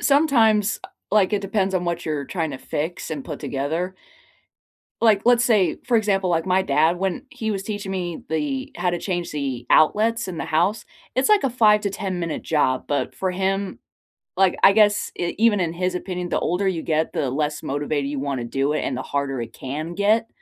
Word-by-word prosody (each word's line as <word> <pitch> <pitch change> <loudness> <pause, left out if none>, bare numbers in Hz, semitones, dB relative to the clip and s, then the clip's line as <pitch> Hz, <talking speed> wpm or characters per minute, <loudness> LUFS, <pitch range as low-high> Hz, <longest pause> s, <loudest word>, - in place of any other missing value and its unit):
sometimes, 235 -8 +3
uh - - -8 0.2
like 210 -1 +4
it 205 - +1
depends 195 -1 -1
on 180 - 0
what 170 0 -3
you're 150 -3 -2
tryna 160 -6 -3
fix 160 +4 -4
and 145 -4 -4
put 150 -4 -6
together 160 +7 -2 1.1
like, 220 -3 +4
let's 240 0 +5
say, 215 -6 +3
for 245 -2 +3
example, 195 -3 +1
like 165 -1 +1
my 190 0 +3
dad, 160 +2 +2
when 190 +5 -2
he 220 -1 -3
was 195 -2 -3
teaching 205 -2 -4
me 175 -3 -4
the 270 - -2
how 180 - +1
to 175 0 -2
change 175 -3 -3
the 135 -5 -3
outlets 225 +8 +3
in 180 -3 -5
the - - -3
house, 180 +7 +1 0.3
it's 260 - +2
like 420 -5 +5
a 270 - +2
5 215 -3 +4
to 200 - -1
ten-minute 180 -4 -3
job, 130 -5 +1
but 145 - -1
for 190 -1 -1
him, 195 +1 -2 0.6
like, 190 -1 +4
I 195 - +9
guess 205 0 +3
e 175 - -2
even 220 -2 +4
in 170 -3 -1
his 180 +1 -1
opinion, 180 -1 -4
the - - 0
older 185 +3 0
you 175 -4 -1
get, 160 0 0
the 135 - -1
less 150 +3 -2
motivated 145 0 -2
you 145 -1 -3
wanna 135 -3 -2
do 135 +4 0
it 155 - 0
and 135 - -2
the 130 - -3
harder 140 -3 -2
it 115 0 -7
can 155 +6 -5
get 215 +3 +2
180 Hz, 205 wpm, -23 LUFS, 155-210 Hz, 1.1 s, I